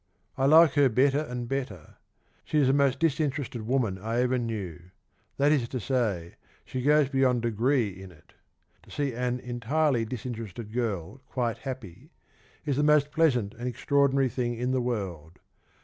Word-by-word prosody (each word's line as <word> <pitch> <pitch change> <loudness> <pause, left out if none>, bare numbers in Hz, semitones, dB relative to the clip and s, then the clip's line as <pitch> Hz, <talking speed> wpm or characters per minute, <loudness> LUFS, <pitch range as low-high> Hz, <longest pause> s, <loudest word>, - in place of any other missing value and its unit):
I 135 - +1
like 160 0 +7
her 145 -3 +4
better 135 +4 +3
and 125 -5 -4
better. 120 - -5 0.5
She 155 - -2
is 145 - +4
the 130 - +3
most 140 -2 +3
disinterested 140 -7 -1
woman 115 -7 0
I 115 +4 -1
ever 125 0 +1
knew 95 -7 -5 0.2
— - - -42
that 145 +2 +3
is 130 -6 +1
to 130 - -3
say, 105 -9 -2 0.3
she 130 - -4
goes 150 +1 +4
beyond 130 -3 +1
degree 120 +1 +1
in 95 0 -11
it. 75 -4 -21 0.5
To - - -21
see 140 -3 -2
an 125 +1 -2
entirely 125 +1 0
disinterested 115 -2 -6
girl 110 -1 -3
quite 120 -3 -2
happy 130 - -8 0.6
is 140 -3 0
the - - +2
most 150 -1 +4
pleasant 125 -11 +2
and 120 +1 -6
extraordinary 140 +2 +2
thing 120 0 -2
in 125 +2 -2
the 130 -1 +1
world. 90 -9 -4
125 Hz, 165 wpm, -27 LUFS, 110-140 Hz, 0.6 s, like